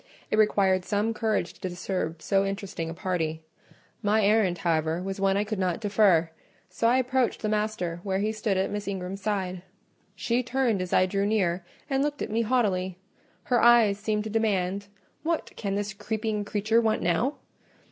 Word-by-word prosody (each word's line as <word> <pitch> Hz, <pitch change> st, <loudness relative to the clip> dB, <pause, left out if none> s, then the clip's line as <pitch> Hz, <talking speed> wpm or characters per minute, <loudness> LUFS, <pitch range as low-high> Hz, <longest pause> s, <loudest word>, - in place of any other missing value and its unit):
It 215 Hz, -, +2 dB
required 195 Hz, -3 st, +3 dB
some 210 Hz, +3 st, 0 dB
courage 215 Hz, -5 st, -1 dB
to 185 Hz, -, -5 dB
disturb 175 Hz, -2 st, -3 dB
so 195 Hz, 0 st, +2 dB
interesting 195 Hz, -4 st, -4 dB
a -, -, -5 dB
party; 165 Hz, -4 st, -2 dB, 0.6 s
my 210 Hz, 0 st, +2 dB
errand, 205 Hz, -4 st, +3 dB
however, 160 Hz, -1 st, 0 dB
was 195 Hz, 0 st, -4 dB
one 195 Hz, 0 st, +2 dB
I 205 Hz, -, +2 dB
could 210 Hz, -1 st, -4 dB
not 180 Hz, -3 st, 0 dB
defer, 200 Hz, -6 st, +3 dB, 0.4 s
so 230 Hz, +5 st, +1 dB
I 245 Hz, +2 st, +4 dB
approached 255 Hz, -2 st, 0 dB
the 215 Hz, -, 0 dB
master 210 Hz, -5 st, -1 dB
where 190 Hz, 0 st, -1 dB
he 210 Hz, +2 st, 0 dB
stood 215 Hz, -3 st, -1 dB
at 190 Hz, -, 0 dB
Miss 205 Hz, 0 st, -4 dB
Ingram's 195 Hz, 0 st, -4 dB
side. 190 Hz, -3 st, -2 dB, 0.5 s
She 230 Hz, +6 st, 0 dB
turned 245 Hz, -5 st, 0 dB
as 185 Hz, -, -4 dB
I 185 Hz, -, +4 dB
drew 195 Hz, +2 st, 0 dB
near, 185 Hz, -5 st, +1 dB, 0.2 s
and 270 Hz, -2 st, +1 dB
looked 290 Hz, 0 st, -1 dB
at -, -, -5 dB
me 225 Hz, +2 st, +1 dB
haughtily: 200 Hz, -7 st, 0 dB, 0.5 s
her 245 Hz, -2 st, +2 dB
eyes 230 Hz, -4 st, +5 dB
seemed 210 Hz, 0 st, -1 dB
to 215 Hz, -, -5 dB
demand, 200 Hz, -3 st, 0 dB, 0.3 s
"What 330 Hz, +1 st, -2 dB
can 200 Hz, -2 st, -2 dB
the 205 Hz, 0 st, -2 dB
creeping 215 Hz, -1 st, -2 dB
creature 215 Hz, +3 st, +2 dB
want 220 Hz, -1 st, +1 dB
now?" 185 Hz, -, +1 dB
205 Hz, 180 wpm, -27 LUFS, 185-220 Hz, 0.6 s, eyes